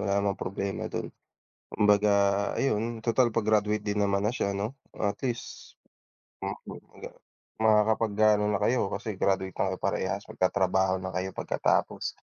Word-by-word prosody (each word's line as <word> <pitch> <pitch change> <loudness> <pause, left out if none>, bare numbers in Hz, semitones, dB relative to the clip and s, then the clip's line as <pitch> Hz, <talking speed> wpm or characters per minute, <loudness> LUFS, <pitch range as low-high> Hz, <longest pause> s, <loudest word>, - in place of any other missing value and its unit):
wala 100 -1 0
namang 100 0 0
problema 100 +1 -3
dun. - - -5 0.6
Kumbaga 105 0 +3 0.5
ayun 115 -2 0
total 120 +1 +3
pa-graduate 105 -1 +1
din 105 0 0
naman 100 0 +1
na 110 - +1
siya 100 -5 -1
'no, 105 +6 -3 0.2
at 100 0 -1
least. 120 -3 -5 0.7
Mhm, - - -6 0.2
agang - - -9 0.5
Makakapag-gaano 110 -1 +3
na 105 - +1
kayo, 120 -3 +1
kasi 110 +1 -4
graduate 95 -1 +1
na - - -1
kayo - - -3
parehas. - - -2
Magtatrabaho 95 0 +1
na 95 0 -6
kayo 95 +1 -2
pagkatapos. - - -1
105 Hz, 140 wpm, -28 LUFS, 100-110 Hz, 0.7 s, Kumbaga